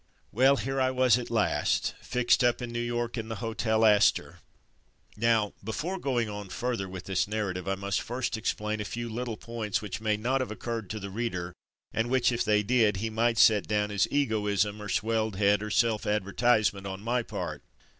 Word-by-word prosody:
Well, 130 +5 +5
here 135 +3 -2
I 130 - +3
was 130 -2 +3
at 120 - -6
last, 110 -3 +1
fixed 125 0 +2
up 120 -1 +3
in 120 -2 -5
New 120 - -3
York 120 0 -2
in 110 - -5
the 115 - -3
Hotel 110 0 0
Astor. 105 -1 +3 0.8
Now, 110 -2 +2
before 165 - -3
go 135 -6 0
ing 115 - 0
on 105 -2 -7
further 120 -5 -3
with 95 0 -7
this 95 +1 0
narrative, 100 -4 -3
I 95 - 0
must 100 0 -2
first 125 0 -3
explain 105 -1 -2
a - - -1
few 120 +3 -5
little 115 0 -4
points 115 -4 -3
which 105 0 -6
may 105 -1 +1
not 130 +5 0
have 130 - -3
occurred 110 -2 -5
to 110 - -4
the 100 -1 -7
reader 95 -5 -3 0.4
and 115 +1 0
which, 130 -1 +3
if 120 - 0
they 105 0 +2
did, 110 -3 +3
he 110 +3 -3
might 115 +1 +1
set 105 -2 +5
down 105 0 0
as 100 -1 +2
egoism 105 -6 0
or 105 - -6
swelled 110 0 0
head, 100 +1 +3
or 105 - -4
self 115 -1 +1
advertisement 105 0 +1
on 95 0 -6
my 120 +3 0
part. 80 - -5
110 Hz, 200 wpm, -28 LUFS, 105-120 Hz, 0.8 s, Well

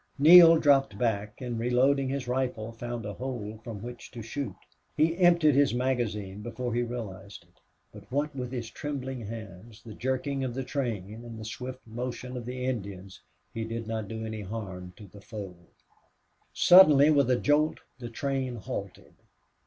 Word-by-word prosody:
Neale 165 +3 +9
dropped 135 -8 +3
back 105 -2 -1
and, 120 -2 -3
reloading 130 +3 +2
his 135 -2 -3
rifle, 125 -3 -2
found 120 0 -6
a 105 - -4
hole 115 -4 -5
from 110 -4 -7
which 120 0 -8
to 115 -2 -8
shoot. 115 -3 -4 0.4
He 160 +2 +3
emptied 170 -4 +5
his 140 -3 +3
magazine 110 -6 -2
before 120 +2 -4
he 120 - +1
realized 105 -5 -6
it. - - -31 0.3
But - - -14
what 145 +2 -1
with 125 -2 -4
his 120 -3 -4
trembling 130 -5 -5
hands, 110 0 -9
the 110 - -9
jerking 130 +3 -2
of 125 -2 -3
the 135 - -2
train, 115 -8 -3
and 115 -2 -9
the 110 - -7
swift 125 +4 -7
motion 125 +2 -5
of 120 -1 -6
the 125 0 -4
Indians, 100 -6 -5 0.3
he 115 - -3
did 115 0 -4
not 110 -1 -3
do 110 +1 -5
any 110 -1 -5
harm 95 -3 -6
to 105 - -11
the 100 +1 -14
foe. 100 -4 -7 1.0
Suddenly, 155 -5 +7
with 140 -4 +3
a 125 - +4
jolt, 150 +4 +2 0.2
the 120 -1 -6
train 135 0 -2
halted. 110 - -7
120 Hz, 170 wpm, -28 LUFS, 110-135 Hz, 1.0 s, Neale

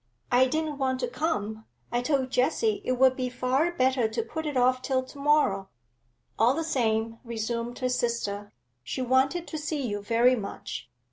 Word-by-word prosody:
I 250 +1 +5
didn't 310 +1 -2
want 260 -1 0
to 250 - 0
come; 225 -5 -2 0.3
I 240 0 +1
told 260 -1 0
Jessie 400 - +1
it 255 - 0
would 260 +1 +4
be 255 -1 -2
far 255 +6 +1
better 260 -6 +2
to 220 +1 -2
put 315 +7 -5
it 290 -3 -2
off 255 +1 +3
till 260 -1 0
to 280 +2 -13
morrow 280 -10 +2 0.3
' 120 0 -31
'All 240 +4 +5
the 325 - -1
same,' 230 -6 0
resumed 235 +1 -3
her 255 - -1
sister, 230 -5 -2 0.3
'she 255 - -3
wanted 265 +7 +2
to 310 - -4
see 300 -2 -2
you 205 -1 -3
very 235 +4 +4
much. 200 - -6
255 Hz, 185 wpm, -27 LUFS, 230-280 Hz, 0.3 s, I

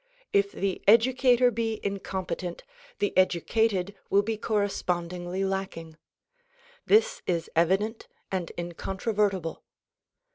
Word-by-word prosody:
If 200 0 +3
the 195 -1 -2
educator 245 +2 +5
be 225 -1 -2
incompetent 190 -3 -4 0.3
the 205 - -1
educated 190 +2 +2 0.2
will 200 +1 +4
be 225 +2 -1
correspondingly 180 -3 -1
lacking. 190 -4 -4 0.9
This 460 +4 +4
is 170 -2 -1
evident 195 +7 +1 0.2
and 185 -3 -2
incontrovertible. 190 +1 -2
195 Hz, 95 wpm, -27 LUFS, 180-220 Hz, 0.9 s, educator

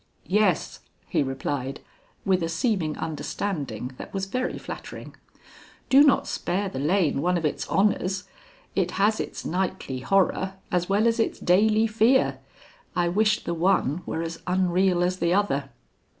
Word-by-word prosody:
"Yes," 200 -3 +1 0.3
he - - +1
replied, 135 0 -3 0.5
with 185 -2 +2
a 165 - -1
seeming 165 -3 0
understanding 145 - -4
that - - -8
was 195 0 -1
very 255 +6 -2
flattering; - - -8 0.8
"do 270 +1 +8
not 285 - +4
spare 195 +3 -2
the 135 - -5
lane 150 -1 +1
one 180 +2 +2
of 165 - -2
its 150 - -2
honors. 190 -2 +1 0.5
It - - +1
has 210 +2 +3
its - - -5
nightly 175 -7 -2
horror 190 +4 +1 0.2
as 180 0 0
well 205 +3 +3
as 230 0 +2
its 225 - 0
daily 215 +5 +3
fear. 225 +4 +3 0.6
I 175 -1 +2
wish 210 +3 +2
the 170 - -2
one 170 -2 +1
were 160 - -2
as 165 0 -6
unreal 180 0 +2
as 180 +1 0
the 170 +2 +2
other." 145 -9 0
185 Hz, 150 wpm, -25 LUFS, 165-205 Hz, 0.8 s, do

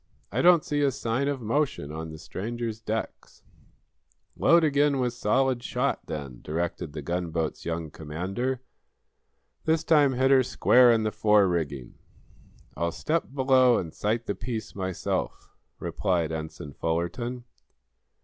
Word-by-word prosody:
"I - - 0
don't 175 -2 +6
see 145 0 0
a 140 - +4
sign 130 +1 -1
of 140 -3 -2
motion 115 - -1
on 80 +1 -6
the 80 - -8
stranger's 115 +6 -5
decks." 110 0 -5 0.9
"Load 170 0 +5
again 145 -1 +3
with 125 -2 0
solid 125 +2 +1
shot, - - -2
then," 70 -5 -6
directed 80 -1 -3
the 75 -2 -6
gunboat's 85 -1 -2
young 80 -2 -3
commander. 95 - -3 1.0
"This 160 0 +2
time 150 -4 +4
hit 130 +2 +2
her 135 -1 +7
square 125 0 +5
in 115 -1 +2
the 110 - 0
fore 105 -2 +4
rigging." 70 -8 -3 0.8
"I'll 85 +3 -1
step 160 - -1
below 130 -2 +5
and 80 -3 -4
sight 115 +3 -1
the - - -1
piece 115 -1 -5
myself," 95 -2 -3 0.3
replied 85 -4 -1
Ensign 80 -2 -6
Fullerton. 105 +10 -2
110 Hz, 140 wpm, -27 LUFS, 85-130 Hz, 1.0 s, her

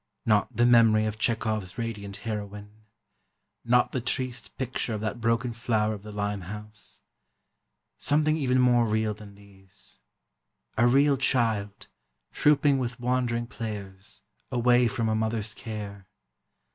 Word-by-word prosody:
not 105 -2 +2
the 120 - +4
memory 115 -3 +5
of 110 0 -3
Chekhov's 110 -4 -1
radiant 105 -4 -5
heroine... 105 0 -6 0.8
not 125 +1 +3
the 130 - -2
triste 125 0 -4
picture 125 -3 -2
of 105 - -5
that 110 +2 -3
broken 115 +1 +1
flower 110 -2 0
of 105 - -7
the 105 +1 -9
Limehouse... 105 +1 -6 1.0
something 155 +1 +2
even 130 -4 +1
more 120 -2 +4
real 110 0 0
than 105 -1 -13
these: 95 -1 -14 0.8
a 120 +2 +4
real 140 +3 +4
child, 110 -6 0 0.5
trouping 145 -2 +3
with 125 -1 -3
wandering 120 -1 0
players, 105 -5 -8 0.3
away 120 0 +4
from 115 -1 -1
a 110 - +1
mother's 110 -1 -1
care 105 -4 -7
110 Hz, 130 wpm, -27 LUFS, 105-120 Hz, 1.0 s, memory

